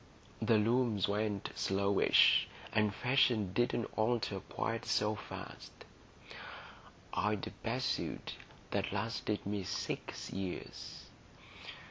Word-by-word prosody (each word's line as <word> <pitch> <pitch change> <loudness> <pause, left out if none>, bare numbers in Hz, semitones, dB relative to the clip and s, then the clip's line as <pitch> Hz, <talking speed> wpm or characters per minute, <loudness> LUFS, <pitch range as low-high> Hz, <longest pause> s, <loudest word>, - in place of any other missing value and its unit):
The 115 - +4
looms 115 -2 +2
went 105 -1 -1
slowish, 100 +1 +4 0.3
and 105 -1 +3
fashions 115 -4 +2
didn't 120 0 +1
alter 110 -3 +1
quite 115 +4 -3
so 105 +1 +2
fast; 105 - -8 1.4
I'd 105 -1 0
a - - -6
best - - -1
suit - - -2 0.4
that 100 -1 0
lasted 105 +1 -2
me 100 -1 -2
six 95 +1 -4
years. 95 -1 -5
105 Hz, 100 wpm, -34 LUFS, 100-115 Hz, 1.4 s, The